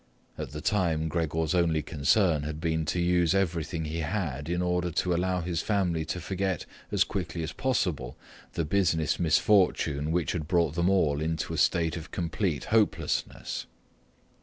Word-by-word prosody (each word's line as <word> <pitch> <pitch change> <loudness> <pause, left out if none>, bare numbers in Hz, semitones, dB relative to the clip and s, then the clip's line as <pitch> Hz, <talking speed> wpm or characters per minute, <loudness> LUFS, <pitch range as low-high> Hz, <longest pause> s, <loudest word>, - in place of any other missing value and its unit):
At - - -5
the 75 +1 -7
time 80 -6 +1
Gregor's 80 -1 -1
only 85 -4 +2
concern 80 +2 +2
had 75 +1 -5
been 80 -1 0
to 85 +3 -1
use 85 0 +3
everything 85 -3 -1
he 80 +2 -3
had 80 -4 -2
in 90 0 0
order 90 0 0
to 90 +2 0
allow 90 +1 0
his 85 -1 -2
family 90 -6 0
to 90 - -3
forget 95 0 -2 0.3
as - - +4
quickly 85 - -4
as 80 - -4
possible 85 - -1 0.4
the 85 - -1
business 80 -3 +1
misfortune 80 -4 +2
which 85 -3 0
had 80 -4 -3
brought 85 -4 +2
them 85 +2 +1
all 75 -7 +2
into 80 0 -2
a - - -3
state 85 -1 +2
of 85 +2 -8
complete 85 -3 -2
hopelessness. 110 -2 0
85 Hz, 160 wpm, -28 LUFS, 80-90 Hz, 0.4 s, as